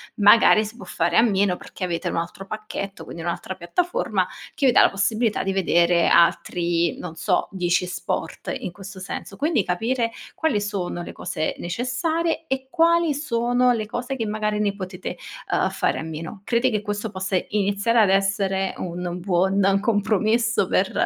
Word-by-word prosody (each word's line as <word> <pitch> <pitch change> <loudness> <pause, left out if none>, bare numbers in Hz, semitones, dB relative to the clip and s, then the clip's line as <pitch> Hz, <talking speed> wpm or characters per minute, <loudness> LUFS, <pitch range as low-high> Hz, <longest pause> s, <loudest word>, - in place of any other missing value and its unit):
magari 215 +1 +6
si 215 +2 -9
può - - -10
fare 170 +1 0
a - - +8
meno, 200 -5 +2
perché - - -9
avete 170 -2 -3
un - - -3
altro 170 +3 -4
pacchetto, 215 -2 -6
quindi 165 - -8
un'altra 175 +2 -4
piattaforma, 355 - -1 0.3
che 275 - +2
vi 255 - +6
dà - - +6
la - - +6
possibilità 215 +3 0
di 195 - -1
vedere 175 -2 +3
altri, 170 0 +2
non 170 -2 -7
so, 180 +2 0
10 180 -1 +1
sport 180 - -4
in 180 - -6
questo 190 +1 -10
senso. 195 0 -6
Quindi 290 - +1
capire 230 +6 0 0.2
quali 310 -11 +1
sono 195 -4 -3
le - - -7
cose 155 -3 -3
necessarie, 315 - -1
e 265 -1 -2
quali 335 -1 +3
sono 245 -3 +1
le 215 -2 -2
cose 245 +3 -4
che 230 -4 -2
magari 210 0 -1
ne 205 -1 0
potete, 185 -1 -6 0.3
uhm, - - +2
fare - - 0
a - - -4
meno. 160 +5 -7
Crede 235 +2 +2
che 215 -4 -1
questo, 205 +1 -3
possa 190 -1 -1
iniziare 205 +3 +1
ad 205 -3 +5
essere 195 0 +1
un 180 0 -4
buon 190 +2 +2
compromesso 220 +2 +2
per, - - +1
200 Hz, 170 wpm, -23 LUFS, 180-230 Hz, 0.3 s, a